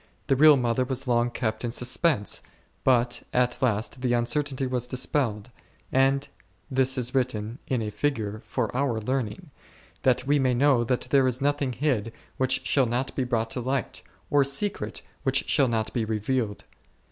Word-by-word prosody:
The 135 - +2
real 150 +1 +7
mother 120 0 +1
was 130 0 -2
long 120 0 +2
kept 120 -1 -3
in 120 - -2
suspense, 125 -1 +1 0.4
but 120 -2 +2
at 125 0 +1
last 120 +1 -1
the 125 -2 +1
uncertainty 135 +3 0
was 125 -1 -2
dispelled; 125 -3 -1 0.4
and 135 +1 +2 0.4
this 130 0 +2
is 125 0 0
written, 120 -2 -1
in 125 -4 0
a 105 - -4
figure, 110 -3 -2
for 125 -2 -3
our 130 -4 0
learning, 110 -2 -3 0.5
that 125 0 +2
we 145 +1 +3
may 130 -2 +2
know 130 -2 +4
that 125 +1 0
there 135 -2 +4
is 125 0 0
nothing 145 -2 0
hid 120 -5 -1 0.3
which 130 0 +1
shall 135 -3 +3
not 125 +3 -2
be 130 - 0
brought 115 -2 -1
to 125 - -3
light, 130 -7 -2 0.3
or 145 -1 +5
secret 140 - -2 0.2
which 135 -1 +1
shall 140 - +3
not 110 -2 -1
be 120 - 0
revealed. 110 0 -2
125 Hz, 170 wpm, -26 LUFS, 115-135 Hz, 0.5 s, real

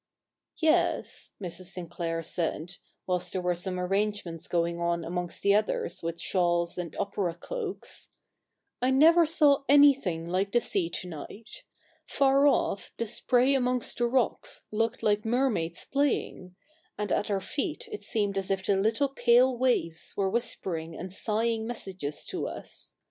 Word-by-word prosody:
' - - -53
Yes,' 320 +1 +1
Mrs. 185 -1 -6
Sinclair 170 -2 -4
said, 170 +1 -2 0.3
whilst 180 -1 -1
there 185 - -2
were 180 0 +2
some 180 +1 -4
arrange 205 +3 0
ments 165 -2 -7
going 170 0 0
on 170 -1 0
amongst 175 0 -4
the 200 - +5
others 215 +1 0
with 165 0 -4
shawls 175 -2 +1
and 170 -3 -5
opera 200 -4 -2
cloaks, 430 - -6 0.4
' - - -54
I 250 - +2
never 320 +5 +6
saw 295 -3 +4
anything 275 - +5
like 190 +3 0
the 240 - +5
sea 190 -7 0
to 180 - -5
night. 200 - -9 0.5
Far 275 0 +4
off 205 -7 +1
the 230 - -1
spray 250 +4 +2
amongst 250 -3 0
the 240 - +3
rocks 265 - -1
looked 225 +2 -1
like 210 0 +2
mermaids 220 -9 0
playing; 270 -9 -1 0.4
and 210 -1 -3
at 210 - 0
our 200 -1 +1
feet 285 - -4
it 420 - -5
seemed 205 -3 0
as 195 0 -4
if 190 -1 -1
the 200 - +2
little 225 +8 +1
pale 250 0 +4
waves 235 -10 -1
were 195 -1 +1
whispering 185 -8 -3
and 185 +1 -7
sighing 225 +2 -1
messages 190 -10 -5
to - - -3
us. - - -9
200 Hz, 160 wpm, -28 LUFS, 175-250 Hz, 0.5 s, never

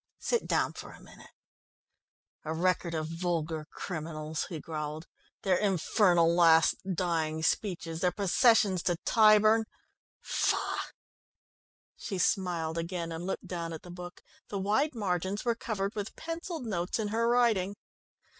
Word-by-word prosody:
Sit 475 - -1
down - - +1
for - - -9
a - - -14
minute." - - -15 1.1
"A 155 +1 -3
record 175 0 0
of 155 -1 -1
vulgar 165 -2 -2
criminals," 155 -2 -4
he 165 - -5
growled. 155 0 -5 0.4
"Their 185 -2 +3
infernal 180 -3 +3
last 165 -2 +6 0.2
dying 160 -3 -1
speeches, 170 -3 -1
their 180 - +3
processions 200 0 +3
to 175 - +1
Tyburn 215 0 +5 0.5
phaugh!" - - -1 1.1
She 195 - -5
smiled 170 -3 0
again, 170 0 -4
and 165 +2 -5
looked 190 - -3
down 170 -2 -4
at 160 - -8
the 180 - -10
book. 175 0 -9 0.3
The 200 - -3
wide 215 +10 +1
margins 190 0 -2
were 235 - +3
covered 210 -3 -3
with 205 0 -5
pencilled 330 -3 -5
notes 180 -5 -2
in 215 -2 -2
her 230 +2 +1
writing. 220 -6 +2
180 Hz, 135 wpm, -30 LUFS, 165-210 Hz, 1.1 s, last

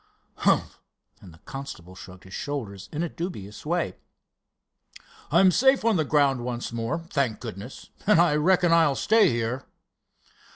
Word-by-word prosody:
"Humph!" - - +1 0.4
and 90 - -13
the 80 - -17
constable 115 -10 -8
shrugged 90 -1 -12
his 95 - -13
shoulders 110 -10 -5
in 155 +2 -2
a - - -1
dubious 150 - -7
way. 175 +1 -1 1.3
"I'm 190 -1 +5
safe 265 +4 +3
on 230 -2 +3
the 160 - +2
ground 140 -4 +2
once 120 -1 -4
more, 115 +8 -3
thank 130 -6 0
goodness; 115 +1 -9 0.2
and 210 -5 +5
I 170 -3 +4
reckon 175 +2 +3
I'll 160 -4 +4
stay 220 +7 +4
here." 120 +2 -2
140 Hz, 150 wpm, -25 LUFS, 115-170 Hz, 1.3 s, I'm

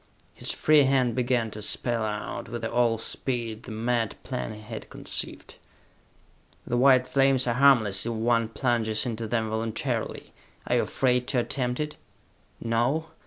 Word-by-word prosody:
His - - -4
free 150 -2 +4
hand 130 -3 +2
began 120 -2 0
to 105 - -7
spell 115 +2 0
out, 105 0 -4
with 115 0 -4
all 115 0 +2
speed, 115 -1 -3
the 120 - -10
mad 115 0 -1
plan 125 -3 -4
he 105 - -9
had 110 +1 -8
conceived. - - -5 1.1
"The 120 - -2
white 130 0 +5
flames 135 -2 +3
are 120 - +1
harmless 115 -6 +4
if - - -1
one 115 0 +1
plunges 115 -2 0
into 115 -2 -3
them 110 -1 -1
voluntarily. 110 0 -3 0.3
Are - - +1
you - - +3
afraid 125 -1 +1
to 135 -3 +1
attempt 125 0 -2
it? 150 0 -3 0.6
No? 120 +8 0
120 Hz, 155 wpm, -26 LUFS, 110-130 Hz, 1.1 s, white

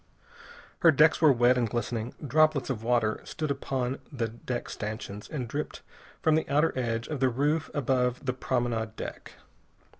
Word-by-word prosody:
Her 170 - +6
decks 155 +2 +5
were 155 -3 +7
wet 125 0 +4
and 115 -2 0
glistening. 120 0 -3
Droplets 150 0 +3
of 115 -4 -3
water 115 -2 +1
stood 155 -2 -3
upon 135 -1 -2
the 125 -5 -1
deck 120 +2 -5
stanchions, 105 -1 -6
and 130 -6 -4
dripped 145 +6 -5 0.4
from 160 - +4
the 160 - +1
outer 150 +3 +3
edge 115 -2 -1
of 150 -3 -4
the 130 0 +3
roof 145 +6 0
above 125 -2 0
the 130 - 0
promenade 120 -4 -1
deck. - - -7
125 Hz, 160 wpm, -28 LUFS, 120-145 Hz, 0.4 s, were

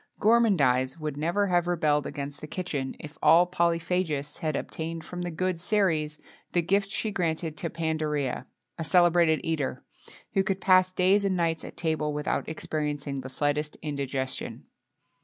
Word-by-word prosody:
Gourmandise 165 - +3
would 155 -2 -3
never 170 +7 +1
have 175 -2 +2
rebelled 155 -4 +1
against 140 0 -6
the 150 - -6
kitchen 150 -6 -3
if 150 -1 -10
all 165 +3 +7
polyphagists 170 -4 0
had 155 -2 -1
obtained 165 +2 -4
from 180 +2 -6
the 175 - -2
good 180 +1 -1
Ceres 165 -6 +1 0.4
the 175 - +2
gift 195 +3 +1
she 215 +1 -2
granted 165 -4 -1
to 170 - -2
Pandarea 155 -4 -2 0.3
a - - -1
celebrated 170 -1 +4
eater, 150 -5 -2 0.5
who 195 - +3
could 190 0 -1
pass 185 -1 +5
days 185 +2 +3
and 190 -2 +1
nights 165 -2 0
at - - -9
table, 155 -2 0
without 150 - -1
experiencing 150 -3 -3
the 130 - -7
slightest 145 +3 -1
indigestion. 135 -3 -3
160 Hz, 155 wpm, -27 LUFS, 150-180 Hz, 0.5 s, all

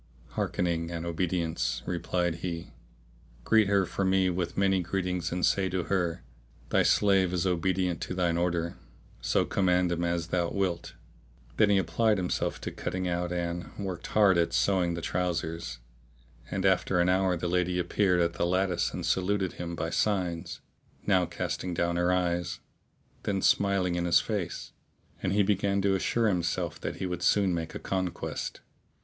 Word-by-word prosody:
"Hearkening 85 -2 -1
and 85 -1 -4
obedience!' 85 -7 -1
replied 85 0 -1
he, 85 -1 -5 0.7
"greet 110 - +4
her 100 -1 +3
for 95 - -3
me 95 -1 +3
with 85 -1 -3
many 95 -1 +3
greetings 90 -1 -2
and 90 +1 +1
say 95 -1 +2
to 90 -1 -1
her, 90 -6 -1 0.5
Thy - - +3
slave 95 -3 +3
is 90 0 0
obedient 90 0 0
to 90 - -4
thine 90 -2 +1
order; 85 -1 -1 0.4
so - - +2
command 90 -2 +2
him 85 0 -1
as 85 -1 -1
thou 85 -1 +1
wilt." 95 -4 -2 0.6
Then 105 -2 +5
he 100 - +4
applied 105 +4 +2
himself 90 -1 -1
to - - -4
cutting 95 0 -3
out 90 0 -1
and 85 0 -3
worked 95 -4 -4
hard 100 -4 +4
at 85 - +1
sewing 90 -3 +2
the 85 - -6
trousers; 85 -7 -2 0.7
and 95 -1 -2
after 95 -1 +3
an 85 - +3
hour 95 -1 +2
the 85 - -2
lady 90 0 +1
appeared 90 +1 +2
at 85 0 +1
the - - -2
lattice 90 -1 +1
and - - -4
saluted 95 0 0
him 85 -1 -5
by 80 +1 -3
signs, 90 -4 -1 0.4
now 95 -4 +3
casting 90 -2 -3
down 85 +1 0
her 90 +1 +2
eyes, 90 -1 0 0.6
then 100 -1 -1
smiling 100 -2 +2
in 85 0 -1
his 85 0 +5
face, 90 +1 -4 0.5
and 95 - 0
he 105 0 +4
began 100 0 +1
to 100 -1 +3
assure 105 +4 +1
himself 85 -3 -1
that - - -3
he 95 - -4
would 90 -1 -3
soon 95 +1 +3
make 80 -1 -4
a - - -4
conquest. 95 -2 -3
90 Hz, 165 wpm, -29 LUFS, 85-95 Hz, 0.7 s, Then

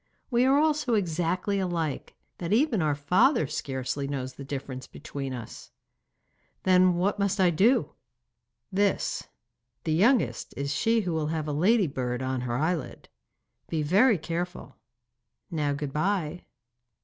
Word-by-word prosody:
'We 240 +1 +3
are 270 +2 +4
all 310 +1 +4
so 275 -6 0
exactly 180 +1 0
alike, 170 -6 -2 0.2
that 170 0 -4
even 235 - +3
our 150 -2 +1
father 180 - +3
scarcely 135 0 -3
knows 130 -2 -4
the 140 - -9
difference 135 -2 -6
between 135 -2 -6
us.' 120 -3 -8 0.9
'Then 185 -1 +5
what 195 +4 0
must 200 0 0
I 180 -2 +5
do?' 210 - +3 0.8
'This. 200 0 0 0.6
The 160 - 0
youngest 190 - +2
is 140 +1 -2
she 225 +9 +2
who 180 -4 -2
will 155 -2 -1
have 155 -1 -2
a 150 - -2
ladybird 145 - +1
on 130 -1 -2
her 120 -1 -2
eyelid. 155 -3 -2 0.6
Be 160 -2 -1
very 205 - +4
careful. 170 -2 -5 0.8
Now 150 -3 0
good 140 -1 -4
bye. 175 0 -1
165 Hz, 140 wpm, -27 LUFS, 140-200 Hz, 0.9 s, Then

